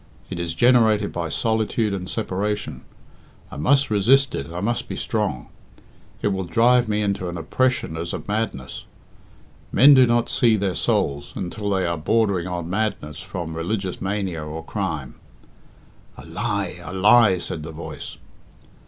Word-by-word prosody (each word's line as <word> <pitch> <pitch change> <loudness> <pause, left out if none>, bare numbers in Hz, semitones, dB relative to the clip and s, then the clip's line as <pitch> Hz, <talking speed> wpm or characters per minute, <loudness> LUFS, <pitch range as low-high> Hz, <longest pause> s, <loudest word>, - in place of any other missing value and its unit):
It - - -4
is 85 -1 -3
generated 110 -1 +4
by 85 -1 -3
solitude 110 - 0
and 90 -2 -4
separation. 100 -7 -3 0.7
I - - -8
must 135 - +2
resist 130 +7 +4
it 70 +3 -4
I 85 - -4
must 120 +5 -1
be - - -4
strong. 65 - -2 0.7
It - - +3
will 95 -2 -2
drive 120 +6 +3
me 105 0 +1
into 100 -3 -1
an 85 - -5
oppression 125 -1 0
as 85 +1 -4
of - - -6
madness. 105 -11 -3 0.9
Men 145 +3 +7
do 130 -2 +6
not 120 0 +2
'see 115 -3 +3
their 100 -3 -1
souls' 70 -3 0
until 100 +2 -4
they 95 -2 +1
are 85 -2 -1
bordering 100 0 +1
on 85 -2 -4
madness 90 -7 -2
from 85 -3 -6
religious 95 +3 -3
mania 95 -5 -2
or 75 +1 -7
crime." - - -4 1.0
"A 65 - -11
lie! 100 +1 -3
a - - -7
lie!" 100 +1 +5
said 85 - -4
the 80 +1 -7
voice. 80 +1 -8
95 Hz, 155 wpm, -23 LUFS, 85-110 Hz, 1.0 s, Men